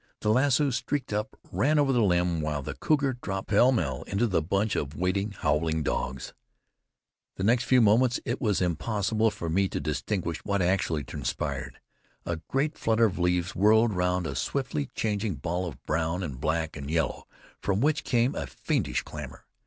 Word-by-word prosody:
The 105 - 0
lasso 140 +3 +3
streaked 130 0 -2
up, 105 +1 -3
ran 150 +3 +2
over 140 -2 +3
the 120 - +3
limb, 90 -4 +2
while 75 -2 -2
the - - -4
cougar 140 -5 0
dropped 95 -1 -4
pell 120 +5 +5
mell 75 - -1
into 100 +4 +1
the 95 -7 +1
bunch 100 +6 0
of 70 +1 -3
waiting, 95 +3 0
howling 80 -2 0
dogs. 65 -2 -3 1.0
The 95 - -4
next 120 +4 +3
few 130 -1 +5
moments 115 +3 +4
it 120 - -2
was 105 -7 +1
impossible 100 +6 +1
for 85 -5 -6
me 95 +4 +2
to - - -3
distinguish 80 - -2
what 100 -1 0
actually 90 -4 +1
transpired. 65 -1 -4 0.5
A 85 - -2
great 150 +3 -1
flutter 115 0 +3
of 95 -4 -1
leaves 90 +2 +1
whirled 110 +3 +4
round 90 -1 0
a - - -3
swiftly 140 +1 -2
changing 105 -3 -1
ball 85 +6 -2
of 80 - -9
brown 80 +4 -1
and 70 -6 -6
black 80 +1 -1
and 70 -2 -6
yellow, 80 0 -1 0.3
from 100 0 0
which 150 +4 +2
came 120 +1 +2
a - - -4
fiendish - - -1
clamor. - - -9
100 Hz, 175 wpm, -27 LUFS, 85-115 Hz, 1.0 s, pell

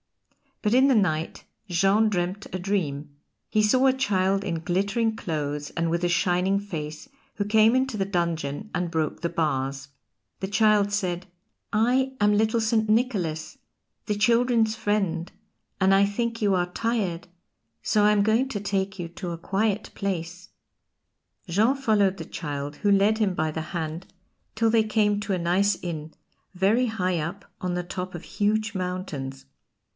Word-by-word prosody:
But 210 0 +2
in 260 +2 +6
the 270 - +4
night 165 -6 0 0.3
Jean 195 +5 +3
dreamed 185 +1 -2
a 185 - -2
dream: 155 -7 -2 0.3
he 215 - +2
saw 255 +5 +3
a 265 - +5
child 195 -7 +1
in 170 -5 -2
glittering 200 +6 0
clothes 150 -5 -3
and 165 0 -1
with 170 +1 -1
a 175 - +2
shining 180 +3 +2
face 160 - -6 0.3
who 205 - -1
came 220 +3 +4
into 260 -3 0
the 195 - 0
dungeon 170 -1 -2
and 180 -1 -1
broke 160 -3 -2
the 170 - -1
bars. 135 -4 -2 0.5
The 190 - -3
child 205 0 +3
said: 185 -3 -1 0.5
"I 255 +5 +2
am 205 0 +4
little 220 +2 +2
St. 220 -1 +1
Nicholas, 200 -9 0 0.5
the 210 - 0
children's 230 +1 +3
friend, 195 -6 -1 0.5
and 190 0 +4
I 195 +1 +5
think 230 +3 -2
you 200 -2 +3
are 180 0 -1
tired, 200 -6 -2 0.6
so 210 -2 +2
I'm 210 -1 +4
going 225 +5 +2
to 210 - -3
take 195 -1 -2
you 175 - -3
to 175 +1 -6
a 170 - -4
quiet 205 +3 -1
place." 180 -2 -4 1.0
Jean 215 +9 +3
followed 210 -8 +2
the - - -6
child, 145 -2 -5
who 205 - +1
led 200 +2 +4
him 205 -4 +2
by 155 -1 0
the 160 - -3
hand 165 0 -4 0.5
till 225 +1 +2
they 225 -1 +4
came 210 -1 +1
to 205 -1 -2
a 185 - 0
nice 185 +4 +2
inn, 160 -3 -5 0.4
very 210 +7 +3
high 185 -6 -1
up 170 +6 -5
on 180 -1 -2
the 180 - -2
top 180 +1 -5
of 175 - -7
huge 215 +1 0
mountains. 160 -8 -4
195 Hz, 165 wpm, -25 LUFS, 170-215 Hz, 1.0 s, in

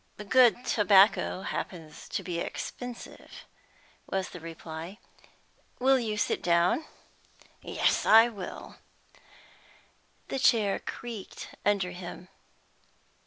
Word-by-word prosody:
"Good 250 -1 +5
tobacco 200 -2 +4
happens 160 -4 -6
to - - -3
be 175 -2 -3
expensive," 245 +6 -7 0.6
was 190 -1 -2
the 180 - -9
reply. 165 +2 -8 0.8
"Will 265 +1 +4
you 215 -3 -3
sit - - 0
down?" 175 - +2 0.8
"Yes, - - +1
I 225 +2 +7
will." 205 -6 -8 1.5
The 270 - -2
chair 215 -6 +3
creaked 225 -5 -8
under 200 -3 +1
him. 180 0 -9
200 Hz, 95 wpm, -28 LUFS, 175-235 Hz, 1.5 s, I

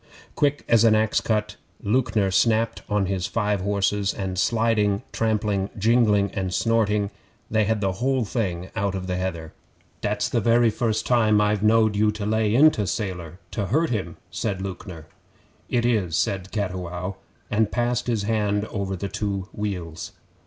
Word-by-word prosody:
Quick 145 0 +1
as 115 -1 +5
an 110 -1 +5
axe 110 0 +2
cut, 105 -1 -1 0.3
Lewknor 105 -3 +1
snapped 115 +3 +2
on 105 -2 +1
his 95 -1 -2
five 105 -3 0
horses, 100 0 0
and 95 -2 -3
sliding, 110 -3 +2
trampling, 105 -3 0
jingling, 105 -2 +3
and 95 -2 -3
snorting, 105 -1 +1 0.4
they 110 -1 +3
had 110 0 0
the 95 -1 +1
whole 125 +5 0
thing 95 -5 -3
out 100 -1 -1
on 95 -1 -4
the 90 -1 -2
heather. 85 -4 -4 0.5
'Dat's - - 0
the - - 0
very 115 0 +4
first 110 -1 -1
time 110 -4 +3
I've 105 -1 +1
knowed 110 0 +4
you 105 +1 +3
lay 105 +1 0
into 135 -7 +5
Sailor 90 -4 -4
to 100 -3 -2
hurt 155 - +1
him,' 95 -7 -3
said 95 +2 -2
Lewknor. 95 -4 -7 0.6
'It 120 -1 +1
is,' 100 -9 +1
said 95 +2 -1
Cattiwow, 90 -2 -3 0.3
and 105 0 +2
passed 120 0 0
his 115 -4 0
hand 105 -1 0
over 100 -2 -2
the 100 +2 -4
two 100 -1 -3
wheals. 90 -6 -4
105 Hz, 160 wpm, -24 LUFS, 95-110 Hz, 0.6 s, as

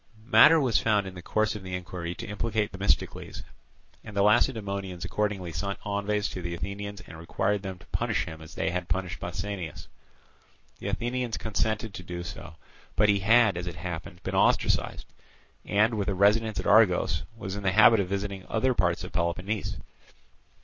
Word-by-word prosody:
Matter 155 +6 +7
was 130 -6 +2
found 105 -3 +2
in 95 - -7
the 90 - -9
course 110 +4 0
of 105 - -6
the 95 -1 -5
inquiry 90 -1 -5
to 115 - -7
implicate 105 0 -1
Themistocles; 95 +1 -1 0.6
and 105 -2 -9
the 100 - +4
Lacedaemonians 100 -5 +1
accordingly 95 -2 -2
sent 100 +6 -3
envoys 100 0 0
to 90 - -6
the 85 0 -4
Athenians 100 +2 -5
and 80 -2 -12
required 95 +4 -1
them 95 -2 -6
to 85 - -18
punish - - 0
him 80 0 -9
as 80 - -12
they - - -1
had 90 0 -3
punished 90 -2 -2
Pausanias. 90 -1 -5 0.9
The - - -6
Athenians 120 -1 -2
consented 110 0 -1
to - - -7
do 85 -1 -6
so. 85 -3 -8 0.4
But 105 +1 +4
he 100 -1 +4
had, 110 0 +5
as 90 0 -4
it 85 - -5
happened, 85 0 -7
been - - -4
ostracized, - - +2 0.6
and, 110 +3 +3
with 105 -3 -1
a 100 - 0
residence 105 +3 +3
at - - -4
Argos, 100 -7 +4 0.2
was 95 -3 -5
in 105 - -5
the 95 -2 +1
habit 110 +2 +7
of 95 - 0
visiting 100 -1 -3
other 130 +3 +2
parts 90 -4 +1
of 90 - -7
Peloponnese. 95 +3 -2
100 Hz, 180 wpm, -27 LUFS, 90-105 Hz, 0.9 s, Matter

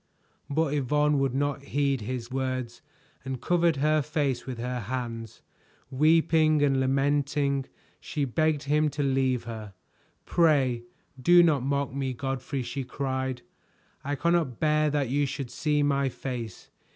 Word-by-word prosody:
But 150 0 0
Yvonne 150 +1 +2
would 135 -2 0
not 145 0 -1
heed 140 -2 0
his 120 +2 -5
words, 130 -2 -3 0.4
and 130 -1 -4
covered 170 0 +2
her 155 +2 +2
face 140 -4 -1
with 130 -2 -5
her 125 +1 -3
hands. 115 -1 -5 0.5
Weeping 155 +1 +4
and 135 -2 +3
lamenting, 140 +1 +1 0.3
she 145 -3 -2
begged 155 +3 0
him 150 +2 +2
to 145 0 -3
leave 130 -2 +1
her. 110 -4 -8 0.5
"Pray 135 -8 +2 0.4
do 175 +5 +7
not 155 -6 +3
mock 140 0 -1
me, 135 -1 -2
Godfrey," 135 +1 -3
she 135 +3 -4
cried, 130 -1 -3 0.6
"I 145 +1 -2
cannot 170 -6 0
bear 155 0 +2
that 145 -4 0
you 140 +2 +1
should 135 -2 -5
see 150 +3 0
my 140 -1 +1
face. 120 -5 -6
140 Hz, 140 wpm, -27 LUFS, 130-150 Hz, 0.6 s, do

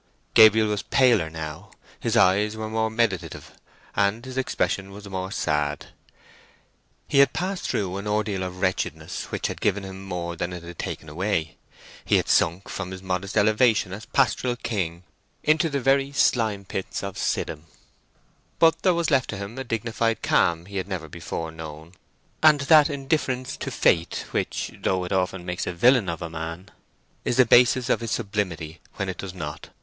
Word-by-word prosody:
Gabriel 110 -1 +7
was 105 -1 -1
paler 120 -11 +3
now. 80 -1 -7 0.3
His - - 0
eyes 105 +4 +3
were 110 0 -4
more 110 0 +1
meditative, 110 -5 -2 0.4
and 100 +4 +1
his 130 -1 -7
expression 100 -6 -1
was 100 +1 -10
more 95 -1 -4
sad. 75 -4 -1 1.2
He 140 - +3
had 140 - +6
passed 185 +2 -3
through 95 -3 -1
an 100 +1 -5
ordeal 105 -2 0
of 90 0 -5
wretchedness 95 -1 -2
which - - -4
had - - -3
given 100 -1 +1
him 95 0 -8
more 85 -2 -4
than 90 +2 -3
it 90 -1 -7
had 85 0 -10
taken 80 - -5
away. 80 0 -2 0.5
He - - +2
had - - +2
sunk 85 +5 +2
from 100 -2 -5
his 95 0 -8
modest 95 +2 -2
elevation 110 -2 +3
as 105 +3 -8
pastoral 130 -2 +1
king 90 -8 -3 0.4
into 155 +2 +3
the 140 -1 -1
very 135 +1 +2
slime 110 -7 +1
pits 95 +1 -4
of 100 -1 -5
Siddim; 75 +2 -2 0.9
but 165 0 +4
there 185 -2 +3
was 170 -1 0
left 135 -2 +2
to - - -4
him 100 +3 -6
a - - -3
dignified 115 -1 -1
calm 85 0 +2
he 100 +1 -7
had 95 0 -2
never 90 -5 -4
before 80 0 -5
known, 80 0 -9 0.5
and 150 -2 +6
that 155 +1 +6
indifference 135 -2 -1
to 135 - -4
fate 85 -9 +1
which, - - -2
though 95 -1 0
it 90 - -6
often 95 -1 -1
makes 90 0 -3
a - - -2
villain 120 +2 +4
of 85 -1 -4
a 85 - -4
man, 85 +4 -6 0.5
is 120 - -1
the 130 - +7
basis 120 +1 +5
of - - +2
his 115 - -3
sublimity 85 -7 -3 0.2
when 95 - -3
it 95 - -5
does 95 -2 -6
not. 75 -4 -6
100 Hz, 180 wpm, -25 LUFS, 90-120 Hz, 1.2 s, Gabriel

